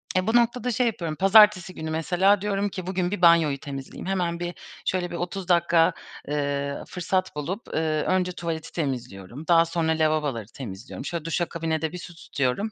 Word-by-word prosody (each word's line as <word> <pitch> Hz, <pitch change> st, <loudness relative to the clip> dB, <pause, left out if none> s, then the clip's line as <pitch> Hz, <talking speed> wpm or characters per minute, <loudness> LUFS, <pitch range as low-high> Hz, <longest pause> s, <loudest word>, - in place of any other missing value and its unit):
Eee, 185 Hz, +2 st, +1 dB
bu 225 Hz, -, +2 dB
noktada 240 Hz, +1 st, +2 dB
şey 240 Hz, +2 st, +2 dB
yapıyorum, 170 Hz, -8 st, -3 dB
pazartesi 195 Hz, -1 st, +6 dB
günü 160 Hz, 0 st, -5 dB
mesela 185 Hz, +5 st, +2 dB
diyorum 205 Hz, 0 st, 0 dB
ki 185 Hz, -1 st, -7 dB
"Bugün 185 Hz, -1 st, -1 dB
bir 205 Hz, -, -3 dB
banyoyu 165 Hz, -5 st, +5 dB
temizleyeyim." 135 Hz, +2 st, -7 dB
Hemen 175 Hz, -3 st, -1 dB
bir 175 Hz, 0 st, -3 dB, 0.3 s
şöyle 180 Hz, -2 st, -1 dB
bir -, -, -4 dB
30 180 Hz, +1 st, -4 dB
dakika, 170 Hz, -1 st, +4 dB, 0.4 s
ııı, 140 Hz, -1 st, -2 dB
fırsat 185 Hz, -1 st, -2 dB
bulup, 180 Hz, +9 st, -4 dB
ııı, 155 Hz, -1 st, 0 dB
önce 185 Hz, -1 st, +1 dB
tuvaleti 165 Hz, -2 st, -5 dB
temizliyorum. 125 Hz, -, -5 dB
Daha 165 Hz, -1 st, +6 dB
sonra 165 Hz, -1 st, 0 dB
lavaboları 155 Hz, -8 st, 0 dB
temizliyorum. 120 Hz, +2 st, -8 dB
Şöyle 170 Hz, -2 st, -4 dB
duşa 170 Hz, +1 st, 0 dB
kabine 160 Hz, -1 st, -2 dB
de 160 Hz, -1 st, -1 dB
bir 180 Hz, -, -6 dB
su 175 Hz, -1 st, -10 dB
tutuyorum. 145 Hz, +7 st, -2 dB
170 Hz, 180 wpm, -25 LUFS, 155-185 Hz, 0.4 s, pazartesi